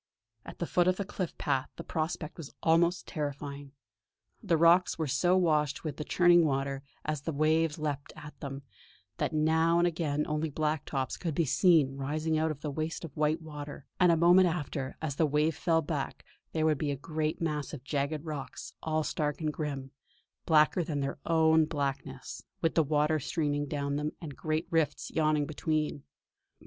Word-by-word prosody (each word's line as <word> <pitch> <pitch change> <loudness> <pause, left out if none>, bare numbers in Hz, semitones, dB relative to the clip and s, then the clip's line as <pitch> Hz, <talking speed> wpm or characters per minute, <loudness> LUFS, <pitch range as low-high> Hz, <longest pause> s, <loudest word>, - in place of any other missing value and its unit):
At - - -9
the 170 - -2
foot 175 +1 +2
of 185 0 +3
the 200 - -2
cliff 185 -3 -4
path 135 -2 0
the 165 - -7
prospect 160 -1 -3
was 150 -4 -7
almost 170 +2 +3
terrifying. 145 -2 -5 0.7
The 165 - +2
rocks 170 +3 +5
were 160 - -1
so 150 +7 +2
washed 150 -5 +1
with 150 -4 -4
the 150 - -3
churning 175 +1 +5
water, 135 -2 -1 0.2
as 150 -2 -2
the 165 - -3
waves 155 +1 +2
leaped 145 -3 -3
at 150 0 -10
them, 140 -1 -6 0.5
that - - 0
now 160 +2 +3
and 170 - +4
again 155 -3 -1
only 150 +1 -1
black 155 +1 -1
tops 135 -2 -2
could 165 -5 -3
be 165 - +2
seen 150 -3 +4
rising 155 +4 -1
out 160 +1 +1
of 150 -2 -5
the 150 - -3
waste 155 +3 -3
of 145 - -11
white 155 +2 +1
water; 145 -2 -8
and 180 -2 +6
a 165 - +3
moment 175 +3 +6
after, 145 -5 -3
as 140 -3 -2
the 160 - +3
wave 150 +2 +1
fell 165 0 +1
back, 145 -2 -4 0.3
there 160 -1 0
would 155 -3 +2
be 150 - -1
a 140 - 0
great 155 +2 -2
mass 150 -3 -2
of 145 -5 -8
jagged 145 +2 -2
rocks, 150 -4 -6
all 155 0 0
stark 150 -1 -2
and 155 -2 -1
grim, 140 -4 -4 0.6
blacker 155 +2 +4
than 150 -4 -2
their 140 +1 -3
own 160 -1 +4
blackness, 135 -3 -4 0.2
with 165 - +1
the 165 - +4
water 150 +1 +2
streaming 145 0 -1
down 140 -1 -2
them, 150 +1 -2
and 150 -5 -7
great 155 +1 -1
rifts 160 -3 0
yawning 155 -2 +2
between. 155 0 -1
155 Hz, 185 wpm, -30 LUFS, 145-165 Hz, 0.7 s, and